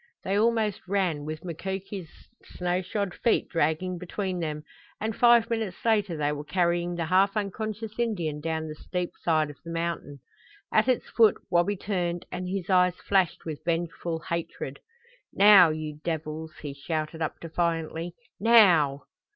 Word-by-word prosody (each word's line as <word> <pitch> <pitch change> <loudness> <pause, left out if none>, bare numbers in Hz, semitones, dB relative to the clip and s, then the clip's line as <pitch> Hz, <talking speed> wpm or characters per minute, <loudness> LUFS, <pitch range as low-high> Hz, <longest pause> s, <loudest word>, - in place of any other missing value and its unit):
They 195 - -1
almost 215 -1 +2
ran, 180 -7 0
with 155 +2 -6
Mukoki's 190 +1 -5 0.3
snow 180 0 -2
shod 195 0 -3
feet 235 - +1
dragging 165 +3 0
between 185 +1 -3
them, 150 -2 -3 0.4
and 220 0 -2
five 235 -1 +6
minutes 220 -6 -2
later 210 -7 +2
they 145 -1 0
were 150 0 -4
carrying 175 +1 0
the 170 -1 -2
half 195 +4 +3
unconscious 215 +2 -4
Indian 175 -11 -1
down 160 0 -2
the 155 - -5
steep 175 +3 -4
side 155 -3 +1
of 145 - -16
the 165 - -9
mountain. 165 -4 -3 0.5
At 215 +3 +4
its 255 -2 +1
foot 225 -3 +5
Wabi 175 +3 +2
turned, 175 -3 -2
and 180 0 -4
his 190 -2 -3
eyes 180 -2 +4
flashed 190 -2 0
with 155 -3 -6
vengeful 170 -1 -2
hatred. 170 -1 -4 0.5
"Now, 195 -4 +8
you 155 -1 -4
devils!" 160 -1 -4
he 145 -2 -4
shouted 155 +3 -4
up 155 - -2
defiantly. 165 0 -2 0.2
"Now!" 180 -11 +5
175 Hz, 150 wpm, -27 LUFS, 160-200 Hz, 0.5 s, Now